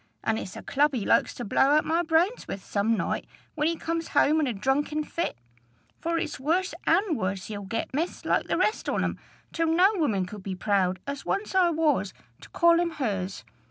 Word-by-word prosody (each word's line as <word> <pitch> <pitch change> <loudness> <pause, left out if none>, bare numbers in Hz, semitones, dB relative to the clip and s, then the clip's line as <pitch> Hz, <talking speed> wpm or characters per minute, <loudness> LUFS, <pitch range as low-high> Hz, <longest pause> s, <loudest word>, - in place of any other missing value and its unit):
an' 220 0 0
it's 185 - -7
a - - -8
club 290 0 +2
he's 220 - -2
like - - +4
to 245 - -7
blow - - +1
out 305 - +3
my 330 +2 +2
brains 345 +7 +1
with 195 - -6
some 215 +2 +1
night, - - -2 0.3
when 300 0 0
he 335 - +1
comes 330 0 -3
home 310 +2 +5
in 300 - +1
a - - 0
drunken 275 +8 0
fit; 335 - -3 0.6
for 335 0 -1
it's 325 -4 -3
worse 340 +7 0
and 355 0 +3
worse 185 -4 -2
he'll 205 -2 -5
get, 225 +6 -4
miss, 325 +6 -2
like - - +1
the - - 0
rest 430 - 0
on - - 0
'em, - - -2 0.3
till 330 0 0
no 355 +5 +5
woman 225 - 0
could 205 +2 -9
be 190 -1 -5
proud, 190 -1 +1
as 280 0 -5
once 405 0 -2
I 370 -2 +4
was, 320 -2 +1 0.2
to - - -14
call 340 -1 +4
him 345 0 +1
hers. 195 - -3
300 Hz, 215 wpm, -27 LUFS, 210-335 Hz, 0.6 s, home